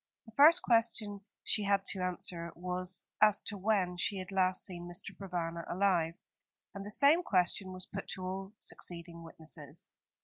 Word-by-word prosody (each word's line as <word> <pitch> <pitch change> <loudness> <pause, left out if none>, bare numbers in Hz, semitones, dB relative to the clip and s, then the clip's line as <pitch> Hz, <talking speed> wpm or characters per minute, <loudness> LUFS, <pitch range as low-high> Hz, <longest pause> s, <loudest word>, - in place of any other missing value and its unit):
The 225 - -13
first 310 +9 +7
question 225 -3 +2 0.2
she 220 - +1
had 200 -1 +2
to 190 - -4
answer 180 -2 -2
was 180 +1 -3 0.2
as 215 -1 +5
to 205 - -3
when 190 -3 +1
she 200 +2 0
had 185 +1 -6
last 185 -1 +2
seen 175 -2 -5
Mr. 180 +2 -7
Provana 170 -3 -3
alive; 175 -3 +2 0.6
and 200 - -6
the 205 - -6
same 285 +10 +5
question 185 - +1
was 185 0 -7
put 195 0 -6
to 185 - -4
all 190 +2 -4
succeeding 170 -3 -6
witnesses. 160 -2 -10
185 Hz, 165 wpm, -33 LUFS, 175-205 Hz, 0.6 s, first